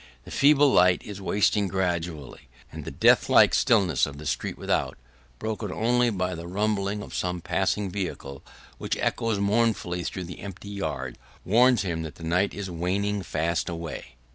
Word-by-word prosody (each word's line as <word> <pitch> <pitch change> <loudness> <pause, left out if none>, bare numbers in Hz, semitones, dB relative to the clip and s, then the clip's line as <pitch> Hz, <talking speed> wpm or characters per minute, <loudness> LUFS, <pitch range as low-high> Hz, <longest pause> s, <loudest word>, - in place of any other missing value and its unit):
The - - -12
feeble 145 -1 +5
light 90 0 +4
is 100 -1 -8
wasting 100 +1 +2
gradually, 85 -8 -3 0.2
and - - -8
the - - -4
deathlike - - +5
stillness 95 - +3
of 70 -1 -9
the 75 - -9
street - - -2
without, - - -1 0.4
broken 110 -2 -4
only 120 +3 +2
by 90 -4 -2
the 85 0 -7
rumbling 105 +1 -1
of - - -11
some 90 0 -2
passing 100 +3 -1
vehicle 90 -8 -5 0.4
which - - -2
echoes 115 -2 0
mournfully 100 -4 0
through 95 +2 -4
the 90 +1 -9
empty 100 0 -8
yards, 70 -11 -4 0.3
warns 120 +2 +4
him 85 -4 -2
that 80 -2 -7
the 80 - -12
night 90 +5 +1
is 100 -1 -4
waning 95 +4 -1
fast 80 -1 -1
away. 85 -7 -7
95 Hz, 165 wpm, -26 LUFS, 85-105 Hz, 0.4 s, feeble